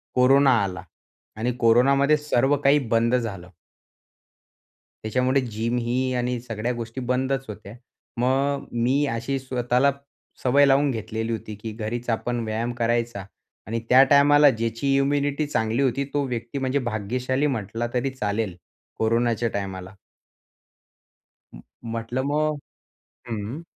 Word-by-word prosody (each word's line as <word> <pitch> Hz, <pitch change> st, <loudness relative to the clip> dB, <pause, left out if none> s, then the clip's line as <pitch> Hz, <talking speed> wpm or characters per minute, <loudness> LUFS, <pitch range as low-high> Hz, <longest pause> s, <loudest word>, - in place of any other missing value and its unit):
Corona 135 Hz, +2 st, +5 dB
आला 95 Hz, -2 st, -4 dB, 0.5 s
आणि 120 Hz, +2 st, -1 dB
कोरोनामध्ये 135 Hz, +6 st, +4 dB
सर्व 145 Hz, -1 st, +1 dB
काही 145 Hz, +1 st, +4 dB
बंद 115 Hz, +2 st, +3 dB
झालं. 100 Hz, -7 st, -4 dB, 1.5 s
त्याच्यामुळे 125 Hz, +4 st, +1 dB
जिम 115 Hz, 0 st, -2 dB
ही 125 Hz, +2 st, -1 dB
आणि 125 Hz, 0 st, -1 dB
सगळ्या 115 Hz, 0 st, -3 dB
गोष्टी 115 Hz, +2 st, -6 dB
बंदच 135 Hz, +1 st, 0 dB
होत्या. 105 Hz, 0 st, -9 dB, 0.4 s
मग 135 Hz, +3 st, 0 dB, 0.2 s
मी 135 Hz, +4 st, +2 dB
अशी 135 Hz, +4 st, -2 dB
स्वतःला 130 Hz, +1 st, +1 dB, 0.5 s
सवय 140 Hz, +3 st, +4 dB
लावून 140 Hz, +1 st, +3 dB
घेतलेली 110 Hz, 0 st, -3 dB
होती, 110 Hz, -1 st, -5 dB
की 110 Hz, +2 st, -7 dB
घरीच 115 Hz, +3 st, -5 dB
आपण 120 Hz, +1 st, -1 dB
व्यायाम 110 Hz, +2 st, -2 dB
करायचा 115 Hz, -3 st, 0 dB, 0.4 s
आणि 115 Hz, +1 st, -2 dB
त्या 130 Hz, +2 st, +7 dB
टायमाला 145 Hz, +1 st, +6 dB
ज्याची 115 Hz, +3 st, -1 dB
इम्युनिटी 145 Hz, +1 st, +1 dB
चांगली 115 Hz, -1 st, 0 dB
होती, 135 Hz, +1 st, +1 dB
तो 140 Hz, +1 st, -2 dB
व्यक्ती 120 Hz, +2 st, -4 dB
म्हणजे 130 Hz, +1 st, 0 dB
भाग्यशाली 125 Hz, +6 st, -1 dB
म्हटला 115 Hz, -2 st, -2 dB
तरी 125 Hz, +2 st, 0 dB
चालेल 105 Hz, -6 st, -3 dB, 0.4 s
कोरोनाच्या 115 Hz, +1 st, +1 dB
टायमाला. 95 Hz, -1 st, -5 dB, 1.6 s
अ, -, -, -10 dB, 0.4 s
म्हटलं 115 Hz, +3 st, -3 dB
मग 150 Hz, 0 st, 0 dB, 0.7 s
हं. 115 Hz, +7 st, -5 dB
120 Hz, 125 wpm, -24 LUFS, 115-135 Hz, 1.6 s, त्या